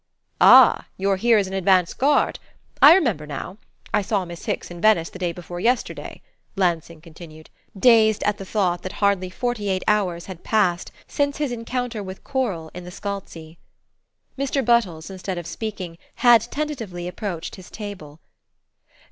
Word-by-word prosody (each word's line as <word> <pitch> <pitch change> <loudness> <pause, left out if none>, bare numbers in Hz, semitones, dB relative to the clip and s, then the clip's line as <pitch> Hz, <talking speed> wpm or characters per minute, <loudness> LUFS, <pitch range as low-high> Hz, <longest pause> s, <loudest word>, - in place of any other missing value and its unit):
"Ah - - +7
you're 195 0 +1
here 230 +3 +4
as 200 - +2
an 190 - -7
advance 185 -2 +2
guard? 290 +3 +1 0.4
I 310 +4 +10
remember 225 - 0
now 150 +7 -6 0.4
I 210 - +3
saw 200 -1 -1
Miss 170 -1 -10
Hicks - - -3
in 175 -1 -9
Venice 210 -7 +3
the 185 - -10
day 175 -2 -1
before 175 0 -8
yesterday," 245 +6 -2 0.3
Lansing 170 -4 -1
continued, 155 -1 -13 0.3
dazed 220 -1 +4
at 205 0 0
the - - -5
thought 185 -3 -1
that 185 - -6
hardly 200 -3 +1
forty 230 0 -3
eight 185 -1 -1
hours 185 -5 +1
had 185 -3 -10
passed 190 -5 +1 0.2
since 285 -1 -1
his 295 -3 -2
encounter 240 -1 -4
with 190 -1 -9
Coral 205 - -3
in 180 - -8
the 180 - -9
Scalzi. 180 -5 -7 0.8
Mr. 275 -1 -1
Buttles, 195 -8 +1
instead 190 -1 -5
of 175 - -6
speaking, 185 -5 -6 0.2
had 240 -2 +6
tentatively 230 -14 -4
approached 180 -2 -5
his 185 - -13
table. 185 -8 -9
195 Hz, 160 wpm, -22 LUFS, 175-225 Hz, 0.8 s, I